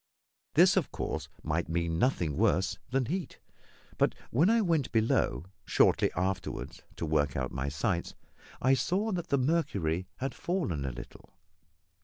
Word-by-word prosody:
This, - - +6
of - - +1
course, - - -4
might 80 +2 -1
mean 85 0 -1
nothing 85 - +1
worse 95 +6 +2
than 130 0 +1
heat; 180 +7 -3 0.6
but - - +3 0.2
when 155 - +4
I 230 +1 +4
went 165 - +1
below 110 -6 +1 0.2
shortly - - +3
afterwards 95 +2 -3
to - - -3
work 75 -3 +1
out 65 -2 -2
my 70 0 -2
sights, 85 +5 -2 0.4
I 130 +1 +4
saw 195 +10 +1
that 175 -3 -2
the 140 - +2
mercury 100 - 0
had 135 0 -3
fallen 140 - -2
a 65 - -2
little. - - -11
95 Hz, 150 wpm, -30 LUFS, -, 0.6 s, This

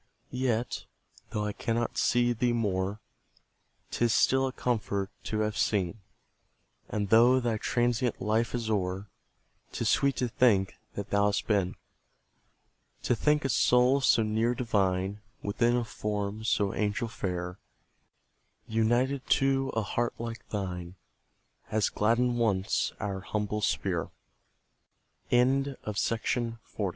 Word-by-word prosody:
Yet, 125 -2 -1 0.4
though 105 0 -2
I 105 - -2
cannot 115 +2 -2
see 120 0 +2
thee 120 +1 +1
more, 100 -2 -1 0.9
'Tis 115 -1 +2
still 135 0 +3
a - - -3
comfort 100 -6 -2
to 110 0 -1
have 105 0 -1
seen; 100 -2 0 0.9
And 105 -2 -2
though 120 +4 +6
thy 115 -3 -1
transient 120 0 0
life 110 +4 0
is 115 -2 -3
o'er, 95 -1 -2 0.6
'Tis - - -2
sweet 140 -1 +3
to 125 - 0
think 110 -5 +3 0.2
that 100 0 -5
thou 100 0 +3
hast 100 - 0
been; 100 -4 +1 1.3
To 125 - +2
think 150 +4 +2
a - - +1
soul 125 +2 +4
so 115 -3 +4
near 110 +3 +1
divine, 100 -4 0 0.2
Within 115 +4 +2
a 120 -1 0
form 105 0 -3
so 100 -2 +1
angel 105 +2 -1
fair, 90 -4 -4 1.1
United 120 +5 +1
to 135 0 +1
a 110 - +1
heart 120 +4 -1
like 115 0 -7
thine, 90 -3 -4 0.7
Has 110 -1 +1
gladdened 120 +3 +1
once 100 -5 +1
our 100 -1 -3
humble 105 +2 -2
sphere. 95 -3 0 1.2
THE 120 - +5
ARBOUR. 135 +2 +1
I'll 105 - -2
rest 115 -1 -2
110 Hz, 130 wpm, -29 LUFS, 100-120 Hz, 1.3 s, though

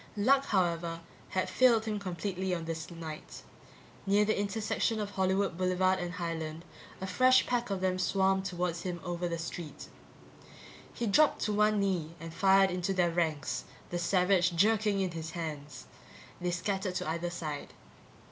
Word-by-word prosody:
Luck, 270 +6 +4
however, 170 -5 0 0.3
had 185 - 0
failed 235 -4 +4
him 215 -2 -2
completely 185 0 -2
on 165 -1 -5
this 165 -1 -4
night. 165 -3 -8 0.6
Near 205 +1 +4
the 215 - +1
intersection 215 +2 -1
of 205 -1 -3
Hollywood 190 -1 0
Boulevard 185 0 +2
and 175 -1 -4
Highland, 165 -1 -4 0.3
a 190 - -4
fresh 255 +7 +4
pack 240 -2 -1
of 195 -2 -2
them 185 -1 0
swarmed 190 +1 +2
toward 180 -2 -2
him 175 0 -4
over 175 0 -2
the 170 -1 -2
street. 165 -3 -7 1.0
He 240 - -3
dropped 290 +9 +4
to 210 - 0
one 210 0 +3
knee 175 -5 -1
and 165 -1 -8
fired 195 +1 +5
into 180 +2 -1
their 175 -2 +2
ranks, 160 -4 -1 0.3
the 175 - -1
Savage 180 0 +2
jerking 210 +2 +3
in 190 -2 0
his 160 -1 -5
hands. 150 -5 -6 0.6
They 180 - 0
scattered 185 +2 -2
to - - -2
either 170 +2 -2
side. 155 -4 -5
185 Hz, 160 wpm, -31 LUFS, 170-200 Hz, 1.0 s, fired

